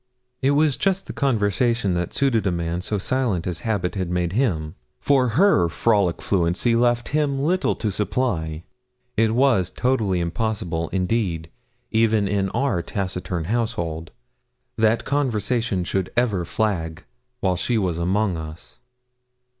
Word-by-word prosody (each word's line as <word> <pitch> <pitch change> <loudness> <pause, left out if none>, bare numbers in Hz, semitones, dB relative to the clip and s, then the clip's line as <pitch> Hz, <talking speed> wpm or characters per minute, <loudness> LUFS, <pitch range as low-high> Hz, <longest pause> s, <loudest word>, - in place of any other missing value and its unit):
It 140 +2 +3
was 150 -3 +3
just 195 0 0
the - - -7
conversation 115 - +1
that 85 0 -2
suited 120 -7 +1
a - - +2
man 85 0 -2
so 105 +3 -2
silent 110 -4 0
as 90 -2 -2
habit 100 -6 -1
had 95 -3 -3
made 90 0 -1
him, 85 - 0 0.3
for 130 -5 +2
her 130 - +4
frolic 100 -1 +1
fluency 95 +5 +1
left 120 0 +2
him 145 -2 +1
little 175 +7 +1
to 105 - -2
supply. 90 -7 -1 0.5
It 110 0 +2
was 120 -9 +3
totally 110 -8 0
impossible, 85 -2 -2
indeed, 90 -4 -1 0.4
even 110 -2 +3
in 100 -1 0
our 120 -5 0
taciturn 90 -2 -3
household, 85 -6 -2 0.7
that 110 0 +2
conversation 115 -7 0
should 95 +1 -2
ever 105 -8 +1
flag 85 -5 -2 0.4
while 95 -2 +1
she 115 +6 0
was 90 -5 -1
among 95 +1 +1
us. 80 +1 -9
100 Hz, 140 wpm, -23 LUFS, 90-120 Hz, 0.7 s, her